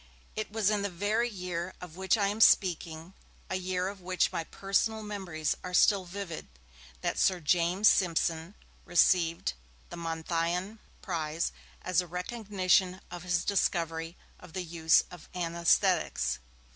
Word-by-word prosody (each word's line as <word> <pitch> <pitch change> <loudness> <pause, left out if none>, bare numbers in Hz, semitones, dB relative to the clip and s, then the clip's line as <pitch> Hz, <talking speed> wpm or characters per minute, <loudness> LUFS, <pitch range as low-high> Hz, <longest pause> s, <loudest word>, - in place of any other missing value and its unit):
It 215 -1 -4
was 215 -1 +2
in 210 -1 +1
the 200 - -1
very 210 +6 0
year 180 -3 -4
of 175 -3 -10
which 190 +3 +2
I 200 -2 +2
am 210 +2 -3
speaking, 170 -3 +3 0.4
a - - 0
year 185 0 -1
of 195 -1 -7
which 185 0 +1
my 165 - -2
personal 215 +4 0
memories 185 -8 -2
are 180 0 -3
still 195 0 +5
vivid, 180 -2 -6 0.5
that - - -1
Sir 185 -2 +3
James 175 +5 +3
Simpson 165 0 +2 0.3
received 170 - +3 0.4
the - - -7
Monthyon 170 +4 -2 0.2
prize 160 -2 -2 0.3
as 185 -1 +2
a 180 - -9
recognition 185 0 0
of 175 -1 -6
his 175 0 0
discovery 165 -3 0 0.2
of 180 -3 -14
the 185 - -3
use 160 -1 +3
of 180 -2 -12
anaesthetics. 170 - +1
180 Hz, 145 wpm, -30 LUFS, 170-195 Hz, 0.5 s, still